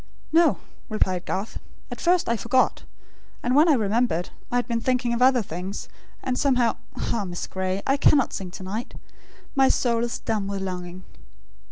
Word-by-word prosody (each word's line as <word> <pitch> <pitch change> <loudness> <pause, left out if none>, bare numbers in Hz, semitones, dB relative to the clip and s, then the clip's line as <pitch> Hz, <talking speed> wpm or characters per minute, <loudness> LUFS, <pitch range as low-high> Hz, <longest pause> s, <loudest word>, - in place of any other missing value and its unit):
"No," 335 0 +5 0.3
replied 185 -4 0
Garth. 195 +4 -3 0.3
"At - - -6
first, 355 0 +3
I 235 - +2
forgot. 240 +4 +1 0.6
And 245 +2 +1
when 310 +4 +6
I - - +7
remembered, 215 -5 0 0.2
I - - -1
had 245 - +1
been 230 -1 -1
thinking 250 -1 +1
of 235 - -1
other 255 -2 +5
things, 185 +3 -6 0.3
and 255 -1 -1
somehow 250 -4 +2 0.2
ah, 225 - -1
Miss 175 -2 -4
Gray! 190 +1 -3
I 275 - +2
cannot 280 -1 +4
sing 190 -2 -4
to 185 - -9
night. 210 +6 -5 0.6
My 270 -1 +4
soul 235 -2 +2
is 235 - -2
dumb 215 -3 -2
with 200 -1 -3
longing." 180 -1 -5
230 Hz, 175 wpm, -25 LUFS, 190-255 Hz, 0.6 s, I